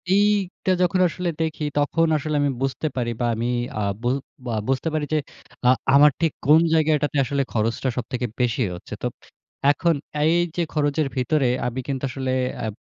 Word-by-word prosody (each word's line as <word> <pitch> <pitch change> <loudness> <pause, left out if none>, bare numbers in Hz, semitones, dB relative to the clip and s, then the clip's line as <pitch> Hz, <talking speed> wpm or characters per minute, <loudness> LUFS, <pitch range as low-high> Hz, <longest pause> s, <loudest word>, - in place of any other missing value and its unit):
এইটা 200 -2 +1
যখন 180 +1 +2
আসলে 175 +1 -3
দেখি 160 -1 -2 0.2
তখন 165 +3 +2
আসলে 150 +1 -3
আমি 145 - +2
বুঝতে 135 +3 -1
পারি 120 -2 -1
বা - - +2
আমি 115 +2 -2 0.3
আ - - 0 0.2
বু 120 - -2 0.4
বা 120 - -2
বুঝতে 135 +4 0
পারি 155 -1 0
যে 155 - +3 0.5
আ - - +7 0.3
আমার 145 +1 +7
ঠিক 165 -3 +2
কোন 155 +3 +7
জায়গাটাতে 150 -2 +2
আসলে 140 +2 0
খরচটা 115 +4 0
সবথেকে 125 0 -2
বেশি 125 0 +1
হচ্ছে। - - -10
তো - - +2 0.6
এখন 170 +1 +1 0.3
এই 160 +2 +4 0.2
যে - - +2
খরচের 145 0 +1
ভিতরে 130 +1 +1 0.2
আমি 125 +2 -4
কিন্তু 135 -2 -3
আসলে 130 0 -3 0.3
অ্যাব 110 -2 -3
145 Hz, 175 wpm, -23 LUFS, 125-160 Hz, 0.6 s, আ